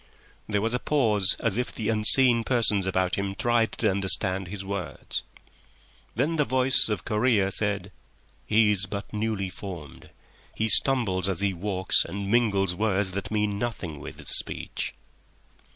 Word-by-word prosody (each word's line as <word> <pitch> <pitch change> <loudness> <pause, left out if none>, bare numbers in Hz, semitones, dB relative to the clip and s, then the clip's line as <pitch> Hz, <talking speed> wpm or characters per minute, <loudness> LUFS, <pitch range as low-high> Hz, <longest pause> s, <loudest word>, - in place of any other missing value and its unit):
There 105 -1 -1
was 115 +1 -1
a 125 - 0
pause 110 -11 +1
as 115 -2 -1
if 125 - -2
the 110 -1 -4
unseen 115 +2 +6
persons 110 -6 +3
about 95 0 -1
him 100 0 -4
tried 120 0 0
to 110 -3 0
understand 95 -1 +2
his 95 +1 -8
words. 100 -2 -5 0.9
Then 150 +8 -1
the 150 - +3
voice 130 -2 +1
of 105 -6 -4
Correa 105 -3 +1
said: 100 0 -3 0.6
"He 110 0 +3
is 100 -1 0
but 100 +2 -7
newly 105 -3 -3
formed. 90 -6 -10 0.5
He 110 0 0
stumbles 100 -9 +4
as 95 -1 -1
he 100 -1 0
walks 95 +1 +1
and 100 0 -6
mingles 100 -6 +1
words 100 0 -1
that 100 +1 -5
mean 105 -2 -2
nothing 95 -10 -5
with - - -10
his - - -8
speech." - - -4
105 Hz, 155 wpm, -25 LUFS, 95-115 Hz, 0.9 s, unseen